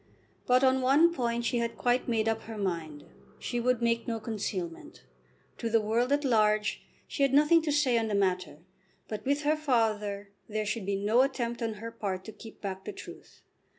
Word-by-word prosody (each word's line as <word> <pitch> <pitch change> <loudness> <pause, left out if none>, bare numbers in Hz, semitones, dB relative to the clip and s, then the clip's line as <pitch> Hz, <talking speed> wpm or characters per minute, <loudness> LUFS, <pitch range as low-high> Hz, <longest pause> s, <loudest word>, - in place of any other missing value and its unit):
But 250 +1 +4
on 260 0 +4
one 290 +7 +5
point 235 -5 -1
she 240 0 +1
had 235 0 -2
quite 245 +1 +1
made 225 -2 +1
up 225 0 0
her 225 -1 -7
mind. 165 -7 -3 0.3
She 240 - -3
would 245 0 +1
make 230 0 +1
no 230 -1 -2
concealment. 200 -6 -5 0.6
To 230 - -2
the 225 0 +4
world 230 +4 0
at 290 0 +2
large 215 -3 +2 0.3
she - - -5
had 275 -1 +3
nothing 300 +3 +5
to 310 -2 -1
say 275 -5 +3
on 225 - -1
the 210 - -1
matter. 185 -5 -1 0.4
But 215 - -5
with 285 +2 +1
her 300 +2 +3
father 215 -8 0 0.2
there 215 0 -2
should 210 -1 -3
be 200 - 0
no 210 +5 +3
attempt 245 -3 -1
on 225 -2 -2
her 230 +2 -7
part 190 -4 -4
to 220 - -7
keep 225 0 -13
back 190 -1 -5
the 210 - -5
truth. - - -12
230 Hz, 200 wpm, -29 LUFS, 210-255 Hz, 0.6 s, one